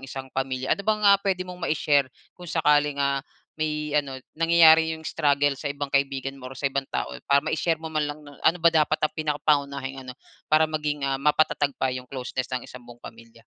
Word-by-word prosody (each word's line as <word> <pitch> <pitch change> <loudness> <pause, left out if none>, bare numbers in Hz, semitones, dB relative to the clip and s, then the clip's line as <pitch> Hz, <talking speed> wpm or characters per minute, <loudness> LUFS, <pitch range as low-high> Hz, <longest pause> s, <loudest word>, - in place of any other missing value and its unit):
isang 135 0 -8
pamilya. 130 -1 -1
Ano - - -1
bang, 215 +1 0
ah, 200 -1 +6
puwede 190 -2 -1
mong 180 0 -10
mai-share 145 -3 +2 0.2
kung 180 -2 -12
sakaling, 150 -3 +2
ah, 140 -1 0 0.4
may 150 -1 -2
ano 140 -3 0 0.2
nangyayari 160 -1 +5
'yong 160 - -15
struggle 145 -2 +1
sa 140 +2 -5
ibang 140 0 -5
kaibigan 135 -1 0
mo 130 - -8
or 130 - -11
sa 135 - -9
ibang 135 0 -1
tao. 65 - -3 0.2
Para 140 0 +4
mai-share 165 +1 0
mo 160 0 -8
man 155 -1 0
lang, 150 +1 -8
'no, 145 -1 -15
ano 165 - +3
ba 170 -1 +3
dapat 155 -1 +2
ang 155 - -1
pinakangunahing 140 -3 -1
ano, 125 - -8 0.3
para 155 +1 +5
maging, 150 -2 -3
ah, 135 0 -1
mapatatag 145 -1 +1
pa 130 -1 0
'yong 125 0 -7
closeness 130 -1 -4
ng 125 - -7
isang 125 - -11
buong 120 0 -14
pamilya? 115 0 -13
145 Hz, 210 wpm, -25 LUFS, 135-155 Hz, 0.4 s, ah